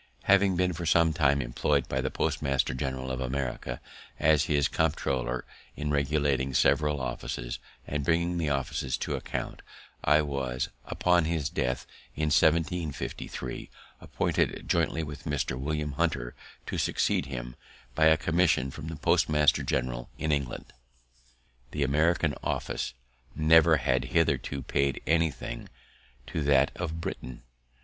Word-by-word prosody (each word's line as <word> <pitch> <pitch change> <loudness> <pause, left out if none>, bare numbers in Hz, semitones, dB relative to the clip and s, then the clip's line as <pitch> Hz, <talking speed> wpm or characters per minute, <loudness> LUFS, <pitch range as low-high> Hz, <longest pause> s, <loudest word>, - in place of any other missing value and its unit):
Having 100 -1 +4
been 90 0 +1
for 85 +1 -4
some 80 0 +4
time 70 -4 +3
employed 70 +3 0
by 65 - -1
the 65 - -1
postmaster 70 -4 0
general 65 0 -3
of 65 0 -3
America 65 -2 -3 0.4
as 75 -1 +4
his 70 -2 +2
comptroller 65 -5 -1 0.3
in 75 -1 -2
regulating 70 -2 +1
several 75 +2 +3
offices, - - -4 0.3
and 75 -1 -2
bringing 85 +3 +1
the 80 -3 0
officers 70 -2 -1
to - - -3
account, - - -4 0.4
I 75 +2 +4
was, 65 -3 -2 0.2
upon 90 -2 +2
his 80 -3 -1
death 65 -1 -1 0.3
in 75 +1 0
1753, 80 0 0 0.3
appointed, - - -1
jointly 80 - +1
with 75 -1 -8
Mr. 75 -4 -1
William 75 +3 -2
Hunter, 70 -5 -1 0.3
to - - -3
succeed 70 - +1
him, - - -6 0.4
by 80 +5 +3
a 80 0 +6
commission 80 -5 +2
from 70 - -8
the 80 - -5
postmaster 75 0 +3
general - - -2
in 80 - -1
England. 70 -4 -2 1.0
The 75 +2 -1
American 75 +3 +2
office - - -2 0.4
never 80 +1 +6
had 65 -2 +1
hitherto 65 +2 0
paid 70 +2 0
anything 80 -2 -1 0.6
to 80 - -3
that 70 -1 +4
of 80 +1 -4
Britain. 65 -7 -6
75 Hz, 135 wpm, -28 LUFS, 65-80 Hz, 1.0 s, a